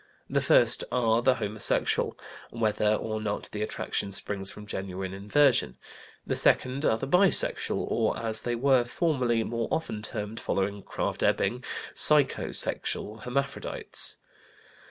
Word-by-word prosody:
The - - 0
first - - +4
are 115 -2 +2
the 130 +1 +3
homosexual, 105 -3 0 0.3
whether 110 -2 +1
or 110 0 -4
not 105 -1 -3
the 105 - -5
attraction 100 -1 -3
springs 100 0 -3
from 105 +1 -9
genuine 95 -2 -5
inversion. 105 - +2 0.5
The - - -1
second 130 +3 +3
are 110 - +3
the 135 - -5
bisexual, 180 +5 +2
or, - - 0
as 110 -1 -2
they 120 -1 -2
were 130 0 +3
formerly 125 -4 0
more 115 0 -3
often 110 -10 -3
termed, 105 0 -3
following 100 +1 -2
Krafft - - -4
Ebing, - - +1 0.3
psycho 150 -3 +3
sexual 105 +1 -1
hermaphrodites. 140 +4 0
110 Hz, 135 wpm, -27 LUFS, 105-130 Hz, 0.5 s, first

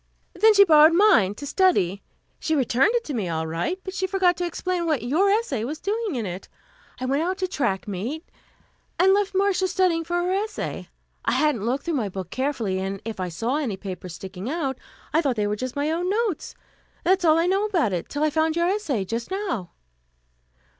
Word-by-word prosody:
"Then 440 0 +5
she 400 - +9
borrowed 315 -3 +7
mine, 255 - +5
to 285 - -8
study. 270 - +2 0.4
She 315 - 0
returned 270 - +2
it 475 - +1
to 295 - -5
me, 210 -8 -2
all 160 -1 -2
right, 170 - -2
but 375 - -6
she 380 -1 -1
forgot 370 -2 +2
to 355 - -1
explain 350 0 -2
what 300 -8 0
your 320 +11 +2
essay 395 - 0
was 300 +6 -4
doing 425 -3 -2
in 230 -3 -2
it. 180 0 -6 0.5
I 255 - -3
went 275 +3 +1
out 365 +3 -1
to 375 - -1
track 240 - -1
meet, 230 - -4 0.7
and 380 +2 +5
left 400 -1 0
Marcia 385 -1 +2
studying 360 -3 +1
for 345 +2 -3
her 350 +1 0
essay. 420 +2 -3 0.3
I - - +1
hadn't 270 -9 +1
looked 260 +4 -1
through 340 - -1
my 235 -9 -1
book 185 -2 -7
carefully, 250 -8 -1
and 195 +1 -3
if 225 -3 -5
I 185 -1 -2
saw 230 - -1
any 245 -11 -2
papers 185 -3 -7
sticking 190 +4 -7
out, 275 -5 -2 0.3
I 320 - +4
thought 275 -6 0
they 210 -2 0
were 205 0 0
just 255 +3 -5
my 290 +2 0
own 350 +3 -1
notes. 420 -3 -1 0.5
That 375 +2 +3
is 365 - -3
all 315 0 +5
I 330 - +2
know 390 +3 +2
about 335 - +1
it, 175 - -3
till 290 +1 -2
I 310 - +2
found 315 +1 +1
your 340 0 +2
essay 300 - -1
just 230 +4 -4
now." 375 - -3
305 Hz, 215 wpm, -24 LUFS, -, 0.7 s, she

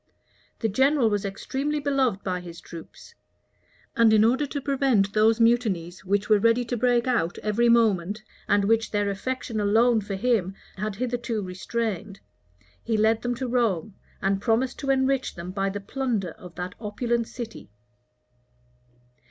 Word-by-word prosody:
The 225 - +2
general 260 +2 +3
was 205 0 -1
extremely 275 +9 -2
beloved 270 -8 0
by 180 -1 -2
his 170 -1 -10
troops; 170 - -12 0.8
and 230 -3 +5
in 215 0 +5
order 260 +6 +2
to 285 - -4
prevent 265 -8 +1
those 220 +2 +4
mutinies 210 -8 +1
which 200 +1 0
were 215 -2 +5
ready 230 +3 +3
to 245 - -2
break 240 0 +2
out 235 -10 0
every 225 +3 +2
moment, 215 -3 +2 0.2
and 205 -1 +3
which 225 +1 +2
their 205 -1 0
affection 230 +2 -3
alone 220 +3 +3
for 200 -1 -5
him 195 -3 0 0.2
had 210 +1 -3
hitherto 240 -2 -2
restrained, 200 +1 -4 0.6
he 225 - 0
led 220 +1 +3
them 245 0 -1
to 255 +1 -3
Rome, 220 -6 0 0.3
and 195 0 +1
promised 245 +3 0
to 275 - -4
enrich 265 0 +1
them 175 +1 -6
by 195 0 -1
the 200 +1 -4
plunder 215 -4 -2
of 175 +2 -13
that 180 +1 -5
opulent 235 +2 -1
city. 235 - -8
220 Hz, 155 wpm, -25 LUFS, 195-245 Hz, 0.8 s, and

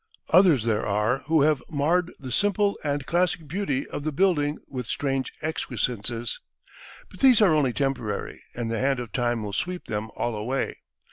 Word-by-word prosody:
Others 170 - +6
there 110 -2 +1
are 105 +5 +1
who 160 -2 +4
have 150 -2 +3
marred 165 +4 +1
the 130 -2 -7
simple 205 - +2
and 145 -2 -1
classic 175 -2 0
beauty 150 -5 -1
of 145 - -5
the 155 - -1
building 150 -3 +2
with 125 -4 -5
strange 135 -1 -1
excrescences. 120 -6 -2 0.7
But 185 - -14
these 255 -4 +6
are 200 -7 +5
only 145 -5 +3
temporary, 120 -6 -2
and 115 -2 -3
the 115 - -1
hand 135 -1 +1
of 120 -3 -6
time 120 -3 0
will 100 -1 -5
sweep 180 - -3
them 105 +1 -3
all 120 - -1
away. 120 +6 -2
140 Hz, 175 wpm, -26 LUFS, 120-165 Hz, 0.7 s, Others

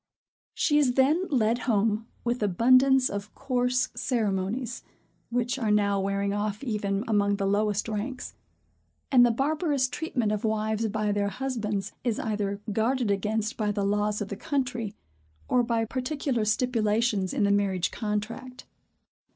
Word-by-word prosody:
She 295 -1 +3
is 265 -4 +3
then 300 +8 +3
led 235 -3 +2
home, 215 +1 +1 0.2
with 240 0 -1
abundance 255 +6 +4
of 200 +1 -6
coarse 250 -1 0
ceremonies, 225 +1 -1 0.5
which 245 +2 -1
are 225 -4 0
now 200 -1 +2
wearing 200 +1 -1
off 205 +2 -2
even 205 -4 -1
among 205 -2 +2
the 200 -1 -2
lowest 205 +1 +1
ranks; 225 +4 -4 0.8
and 250 -3 +7
the 240 - +5
barbarous 285 +2 +1
treatment 250 -6 -2
of 210 -1 -2
wives 220 0 0
by 215 0 -1
their 200 0 0
husbands 220 -5 -3
is 235 -4 0
either 205 -2 -2
guarded 230 +1 +1
against 215 +3 -1
by 210 -2 0
the 200 -1 -1
laws 210 +1 0
of 200 - -3
the 200 - -4
country, 245 -3 -2 0.5
or 250 - +3
by 230 -1 0
particular 255 -1 -2
stipulations 215 -3 +1
in 245 - 0
the 200 - +3
marriage 195 -3 +1
contract. 230 +4 -4
220 Hz, 145 wpm, -27 LUFS, 205-250 Hz, 0.8 s, and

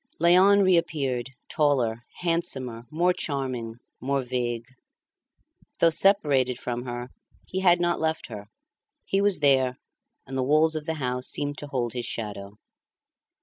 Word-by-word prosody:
Léon 185 +4 +5
reappeared, 155 -9 0 0.2
taller, 125 -7 0 0.2
handsomer, 130 -9 -2
more 175 +3 +1
charming, 130 -8 -3 0.3
more 135 +1 -1
vague. 120 -2 -3 1.1
Though 165 - +5
separated 150 - +3
from 120 0 -5
her, 120 0 -6 0.4
he 190 - -4
had 175 -2 +4
not 175 0 0
left 160 0 -1
her; 105 -3 -9 0.6
he 195 - 0
was 200 -5 +2
there, 130 -3 +3 0.5
and 130 - -8
the 130 - 0
walls 155 +4 +3
of 155 -1 -5
the 160 - -1
house 125 -3 -1
seemed 145 0 -1
to 145 - -7
hold 125 -4 -2
his 120 -1 -3
shadow. 105 -2 -6
135 Hz, 140 wpm, -25 LUFS, 125-165 Hz, 1.1 s, Léon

